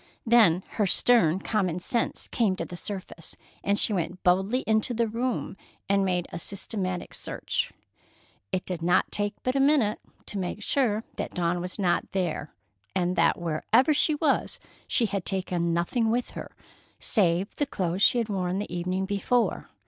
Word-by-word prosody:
Then 215 Hz, -7 st, +5 dB
her 210 Hz, -3 st, +2 dB
stern 185 Hz, -3 st, +4 dB
common 185 Hz, -6 st, 0 dB
sense 230 Hz, +6 st, -1 dB
came 215 Hz, -6 st, +1 dB
to -, -, -4 dB
the 175 Hz, -, -8 dB
surface, 185 Hz, -3 st, -6 dB, 0.3 s
and 200 Hz, +1 st, +1 dB
she 215 Hz, -, +5 dB
went 180 Hz, 0 st, -3 dB
boldly 190 Hz, +8 st, +2 dB
into 220 Hz, +2 st, +1 dB
the 230 Hz, 0 st, +1 dB
room 235 Hz, -1 st, -2 dB, 0.3 s
and 200 Hz, 0 st, +3 dB
made 180 Hz, -2 st, 0 dB
a -, -, -5 dB
systematic 185 Hz, -1 st, -2 dB
search. -, -, -2 dB, 0.8 s
It 185 Hz, -, -2 dB
did 180 Hz, -3 st, -4 dB
not 175 Hz, +2 st, +2 dB
take 205 Hz, 0 st, +1 dB
but 255 Hz, +1 st, 0 dB
a -, -, +2 dB
minute 270 Hz, -7 st, +3 dB, 0.3 s
to 205 Hz, -, -4 dB
make 190 Hz, +3 st, -4 dB
sure 225 Hz, -5 st, +1 dB
that -, -, -4 dB
Dawn 175 Hz, -1 st, 0 dB
was 180 Hz, +1 st, -6 dB
not 180 Hz, -3 st, 0 dB
there, 175 Hz, -5 st, -2 dB, 0.4 s
and 180 Hz, 0 st, +1 dB
that 170 Hz, 0 st, +3 dB
wherever 175 Hz, -, +2 dB
she 300 Hz, +1 st, +2 dB
was 295 Hz, -1 st, 0 dB, 0.3 s
she 235 Hz, -, +2 dB
had 200 Hz, -3 st, -2 dB
taken 180 Hz, -3 st, -1 dB
nothing 195 Hz, +8 st, +1 dB
with 240 Hz, +2 st, -1 dB
her, -, -, -7 dB, 0.5 s
save 185 Hz, -2 st, +2 dB
the 290 Hz, -, 0 dB
clothes 185 Hz, -6 st, -2 dB
she 245 Hz, -, +6 dB
had 230 Hz, -2 st, 0 dB
worn 185 Hz, -3 st, -1 dB
the 200 Hz, -3 st, -4 dB
evening 180 Hz, +2 st, -1 dB
before. 205 Hz, +4 st, 0 dB
195 Hz, 170 wpm, -27 LUFS, 180-225 Hz, 0.8 s, she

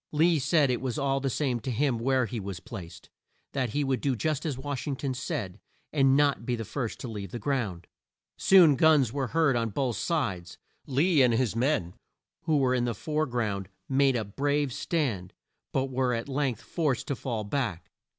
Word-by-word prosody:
Lee 160 Hz, +1 st, +3 dB
said 145 Hz, 0 st, +3 dB
it 125 Hz, -, -1 dB
was 130 Hz, -3 st, -2 dB
all 135 Hz, -1 st, +1 dB
the 135 Hz, 0 st, -1 dB
same 130 Hz, -2 st, 0 dB
to 130 Hz, -, -5 dB
him 125 Hz, 0 st, +1 dB
where 130 Hz, +1 st, +2 dB
he 115 Hz, 0 st, -4 dB
was 95 Hz, -3 st, -5 dB
placed, 85 Hz, -6 st, -10 dB, 0.4 s
that 130 Hz, -3 st, -1 dB
he 145 Hz, +6 st, 0 dB
would 135 Hz, -2 st, 0 dB
do 140 Hz, -3 st, +1 dB
just 155 Hz, +4 st, -1 dB
as 140 Hz, -5 st, -2 dB
Wash 140 Hz, 0 st, -4 dB
ing 140 Hz, -, -1 dB
ton 135 Hz, 0 st, -3 dB
said, 120 Hz, -, -4 dB, 0.3 s
and 135 Hz, -2 st, +4 dB
"not 145 Hz, -4 st, +2 dB
be 120 Hz, +1 st, -1 dB
the 115 Hz, -1 st, -5 dB
first 115 Hz, +1 st, -4 dB
to -, -, -5 dB
leave 105 Hz, -4 st, -6 dB
the 120 Hz, -, -5 dB
ground." 105 Hz, -9 st, -2 dB, 0.5 s
Soon 175 Hz, -7 st, +6 dB
guns 145 Hz, -6 st, +4 dB
were 140 Hz, -2 st, -1 dB
heard 160 Hz, -2 st, +2 dB
on 115 Hz, -1 st, 0 dB
both 120 Hz, 0 st, -1 dB
sides. 115 Hz, -, -2 dB, 0.3 s
Lee 145 Hz, +3 st, +3 dB
and 120 Hz, -3 st, +4 dB
his 120 Hz, -2 st, 0 dB
men, 115 Hz, -, 0 dB, 0.5 s
who 160 Hz, -2 st, +3 dB
were 130 Hz, -2 st, +2 dB
in 125 Hz, -1 st, +1 dB
the 120 Hz, -2 st, -2 dB
fore 155 Hz, +6 st, -1 dB
ground 105 Hz, -6 st, -2 dB, 0.2 s
made 135 Hz, -1 st, +3 dB
a 110 Hz, -3 st, -1 dB
brave 140 Hz, +5 st, 0 dB
stand, 120 Hz, -, -2 dB, 0.4 s
but 135 Hz, 0 st, -1 dB
were 125 Hz, -1 st, +1 dB
at 115 Hz, +2 st, -4 dB
length 135 Hz, -4 st, -1 dB
forced 150 Hz, -7 st, -1 dB
to 140 Hz, -, -2 dB
fall 115 Hz, -3 st, -3 dB
back. 105 Hz, -5 st, -3 dB
130 Hz, 200 wpm, -28 LUFS, 115-145 Hz, 0.5 s, Soon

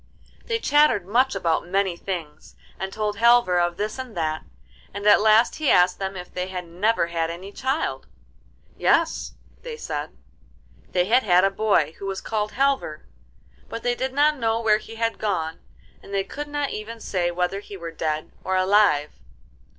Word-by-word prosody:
They 460 Hz, -1 st, 0 dB
chattered 295 Hz, -, +3 dB
much 255 Hz, +7 st, +2 dB
about 165 Hz, 0 st, 0 dB
many 190 Hz, -1 st, 0 dB
things, 170 Hz, -5 st, -7 dB, 0.2 s
and 190 Hz, +1 st, -4 dB
told 210 Hz, 0 st, -2 dB
Halvor 235 Hz, -5 st, +5 dB
of 175 Hz, 0 st, 0 dB
this 215 Hz, +5 st, -3 dB
and 260 Hz, -1 st, -5 dB
of 220 Hz, -, -16 dB
that, 155 Hz, -2 st, -1 dB, 0.5 s
and 200 Hz, -, -5 dB
at 210 Hz, -, +7 dB
last 220 Hz, +2 st, +4 dB
he 310 Hz, -3 st, 0 dB
asked 180 Hz, 0 st, +4 dB
them 195 Hz, 0 st, -3 dB
if 180 Hz, 0 st, -9 dB
they 180 Hz, 0 st, -3 dB
had 180 Hz, -1 st, -5 dB
never 190 Hz, +4 st, +1 dB
had 165 Hz, -1 st, -2 dB
any 180 Hz, +4 st, -7 dB
child. 265 Hz, +7 st, -2 dB, 0.7 s
'Yes,' -, -, +1 dB, 0.3 s
they 475 Hz, -2 st, -7 dB
said; -, -, -5 dB, 0.7 s
they 180 Hz, -1 st, +2 dB
had 240 Hz, +6 st, +4 dB
had 180 Hz, -5 st, +4 dB
a 195 Hz, -, +3 dB
boy 195 Hz, -7 st, +2 dB
who 195 Hz, -, -5 dB
was 195 Hz, 0 st, -3 dB
called 215 Hz, -1 st, -3 dB
Halvor, 270 Hz, -, 0 dB, 0.6 s
but 230 Hz, -, -6 dB
they 245 Hz, -, +1 dB
did 260 Hz, +2 st, -2 dB
not 295 Hz, +2 st, +3 dB
know 225 Hz, -1 st, +1 dB
where 215 Hz, -2 st, +3 dB
he 225 Hz, +1 st, -11 dB
had 230 Hz, 0 st, -1 dB
gone, 165 Hz, -6 st, -2 dB, 0.4 s
and -, -, -13 dB
they 195 Hz, -1 st, 0 dB
could 295 Hz, +8 st, -6 dB
not 290 Hz, -1 st, -2 dB
even 225 Hz, +2 st, -6 dB
say 180 Hz, -5 st, -1 dB
whether 180 Hz, +3 st, -1 dB
he 200 Hz, -1 st, -10 dB
were 170 Hz, -2 st, -7 dB
dead 155 Hz, -1 st, -3 dB
or 190 Hz, -, -1 dB
alive. 185 Hz, -6 st, +3 dB
200 Hz, 180 wpm, -24 LUFS, 180-230 Hz, 0.7 s, at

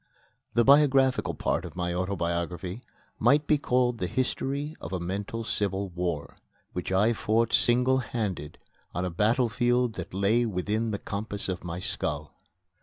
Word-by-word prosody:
The 120 Hz, -, +5 dB
biographical 135 Hz, -1 st, +4 dB
part -, -, 0 dB
of -, -, -8 dB
my 90 Hz, -1 st, -1 dB
autobiography 90 Hz, +1 st, -2 dB, 0.4 s
might 145 Hz, +1 st, +4 dB
be 150 Hz, -1 st, +3 dB
called 125 Hz, -3 st, +1 dB
the 90 Hz, -, -1 dB
history 140 Hz, -, -2 dB
of -, -, -6 dB
a 95 Hz, -, -1 dB
mental 100 Hz, +6 st, -3 dB
civil 100 Hz, -2 st, -1 dB
war, 85 Hz, -5 st, -3 dB, 0.4 s
which 90 Hz, +1 st, -4 dB
I 105 Hz, +5 st, +4 dB
fought 115 Hz, +1 st, +1 dB
single 125 Hz, +2 st, +4 dB
handed 100 Hz, -, -3 dB, 0.4 s
on 90 Hz, +2 st, -1 dB
a 90 Hz, -, -2 dB
battlefield 120 Hz, +4 st, +2 dB
that 90 Hz, -, -5 dB
lay 100 Hz, +5 st, +2 dB
within 110 Hz, +2 st, -1 dB
the 105 Hz, -, -1 dB
compass 100 Hz, 0 st, -3 dB
of 95 Hz, -2 st, -3 dB
my 85 Hz, -1 st, -4 dB
skull. 75 Hz, -4 st, -3 dB
105 Hz, 150 wpm, -28 LUFS, 90-120 Hz, 0.4 s, The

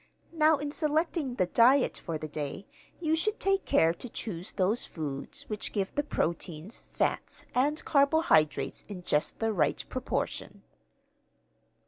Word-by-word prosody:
Now 315 Hz, -1 st, +4 dB
in 290 Hz, +1 st, -4 dB
selecting 305 Hz, -3 st, 0 dB
the 185 Hz, -, +2 dB
diet 250 Hz, +8 st, +4 dB
for 165 Hz, -2 st, -4 dB
the 155 Hz, -, -6 dB
day 150 Hz, +5 st, -5 dB, 0.3 s
you 320 Hz, -2 st, +1 dB
should 430 Hz, +7 st, -1 dB
take 390 Hz, 0 st, +1 dB
care 165 Hz, +1 st, +4 dB
to 240 Hz, +8 st, -8 dB
choose 185 Hz, -6 st, -5 dB
those 200 Hz, +5 st, +1 dB
foods 145 Hz, -4 st, -5 dB
which 215 Hz, -1 st, -3 dB
give 195 Hz, -3 st, -2 dB
the 290 Hz, -, +1 dB
proteins, 170 Hz, -, -3 dB
fats, -, -, -1 dB
and 290 Hz, +5 st, +1 dB
carbohydrates 280 Hz, -, +3 dB
in 190 Hz, -4 st, -8 dB
just 150 Hz, -3 st, 0 dB
the 225 Hz, -1 st, 0 dB
right 155 Hz, -7 st, +1 dB
proportion.'" 255 Hz, 0 st, -3 dB
230 Hz, 140 wpm, -29 LUFS, -, 0.3 s, Now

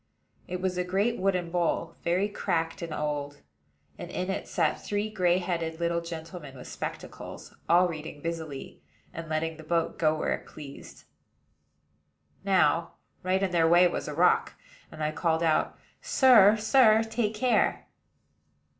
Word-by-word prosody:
It 180 Hz, 0 st, -4 dB
was 185 Hz, -1 st, -1 dB
a -, -, +1 dB
great 200 Hz, +6 st, 0 dB
wooden 185 Hz, -3 st, 0 dB
bowl, 170 Hz, -1 st, -1 dB
very 180 Hz, +4 st, +1 dB
cracked 165 Hz, -5 st, -2 dB
and 170 Hz, -1 st, -5 dB
old; 145 Hz, -1 st, -4 dB, 0.6 s
and -, -, -7 dB
in 185 Hz, +1 st, -3 dB
it -, -, -4 dB
sat -, -, 0 dB
three 205 Hz, +1 st, -2 dB
gray 180 Hz, -4 st, +2 dB
headed 170 Hz, -3 st, -3 dB
little 170 Hz, 0 st, 0 dB
gentlemen 165 Hz, -4 st, -8 dB
with 125 Hz, -, -10 dB
spectacles, -, -, -7 dB, 0.2 s
all 175 Hz, +2 st, +5 dB
reading 155 Hz, -3 st, -7 dB
busily, 160 Hz, -3 st, -6 dB, 0.3 s
and 165 Hz, -2 st, -7 dB
letting 160 Hz, +1 st, -2 dB
the 160 Hz, -, -11 dB
boat 165 Hz, +1 st, -1 dB
go 155 Hz, -1 st, +3 dB
where -, -, 0 dB
it -, -, -7 dB
pleased. 140 Hz, -2 st, -11 dB, 1.4 s
Now, 180 Hz, -3 st, +2 dB, 0.3 s
right 185 Hz, +1 st, 0 dB
in 190 Hz, -, 0 dB
their 165 Hz, -2 st, +3 dB
way 175 Hz, +1 st, +6 dB
was -, -, -4 dB
a 150 Hz, -, -5 dB
rock; 180 Hz, +3 st, +3 dB, 0.4 s
and 155 Hz, -, -6 dB
I 150 Hz, -, 0 dB
called 160 Hz, +1 st, 0 dB
out, 160 Hz, -2 st, +1 dB, 0.2 s
"Sir, 220 Hz, -6 st, +6 dB
sir, 220 Hz, 0 st, +5 dB
take 225 Hz, -1 st, -2 dB
care." 245 Hz, +3 st, +1 dB
170 Hz, 155 wpm, -28 LUFS, 160-190 Hz, 1.4 s, way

